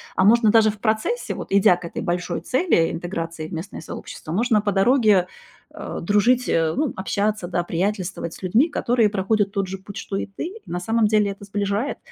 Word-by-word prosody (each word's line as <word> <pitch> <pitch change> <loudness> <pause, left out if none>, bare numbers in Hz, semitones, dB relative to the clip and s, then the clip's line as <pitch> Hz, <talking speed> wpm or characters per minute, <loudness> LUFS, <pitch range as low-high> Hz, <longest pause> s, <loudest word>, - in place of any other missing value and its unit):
А 190 - +3
можно 220 +1 +5
даже 220 -1 +5
в 210 - -14
процессе, 220 - -1
вот - - -6
идя 195 -2 +5
к 180 - -13
этой - - -5
большой 175 0 -2
цели 260 - +2
интеграции 165 -2 -5
в - - -10
местное 170 +3 -6
сообщество, 155 - -8
можно 215 +3 +2
по 205 -1 0
дороге, 205 -2 +4 0.5
э, - - -6
дружить, 215 +7 +2
э, 160 -1 +1
ну, 295 -3 0
общаться, 200 0 -1
да, 175 -1 0
приятельствовать 180 -1 -2
с - - -12
людьми, 220 - +3
которые 235 -6 +2
проходят 200 0 0
тот 195 -2 -1
же 190 +1 -5
путь, 200 +1 -11
что 200 - -5
и - - -2
ты, 195 - -7
и 430 +4 -10
на 175 - -4
самом 225 +4 +1
деле 210 -1 +2
это 200 +1 -10
сближает. 205 +5 -2
200 Hz, 205 wpm, -22 LUFS, 180-220 Hz, 0.5 s, можно